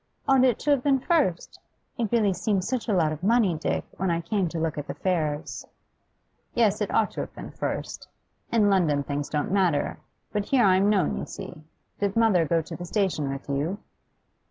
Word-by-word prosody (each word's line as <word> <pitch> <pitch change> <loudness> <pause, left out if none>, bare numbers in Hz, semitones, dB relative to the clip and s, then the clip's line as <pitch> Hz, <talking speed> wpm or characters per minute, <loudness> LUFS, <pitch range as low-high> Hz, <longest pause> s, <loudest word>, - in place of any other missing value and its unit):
'Ought 270 -1 +5
it 250 -3 +3
to 295 - +1
have 280 -3 +3
been 275 0 +3
first? 270 - 0 0.4
It 230 -5 -2
really 215 -5 +3
seemed 185 +2 0
such 250 +2 -2
a - - +2
lot 165 -5 +2
of 155 0 -5
money, 210 -3 +3
Dick, 155 - -2
when 190 0 0
I 170 -1 +1
came 180 +1 -1
to 165 - -5
look 160 -1 -1
at 145 - -6
the - - -5
fares.' 155 -5 -2 0.9
'Yes, 215 -3 +2
it 210 - -1
ought 220 - +2
to - - -4
have - - -8
been - - -8
first. - - -4 0.4
In 220 -3 +4
London 165 -8 +2
things 145 +1 -3
don't 150 +2 -1
matter, 180 -7 +1 0.3
but 205 -1 -1
here 255 -3 +3
I'm 190 +1 +4
known, 195 -6 +2
you - - -4
see. 185 -5 -9 0.4
Did 200 -1 -1
mother 210 -8 +3
go 165 0 +1
to 165 - -8
the 175 - -7
station 175 -7 0
with 135 0 -6
you? 145 +7 -1
190 Hz, 205 wpm, -26 LUFS, 160-215 Hz, 0.9 s, Ought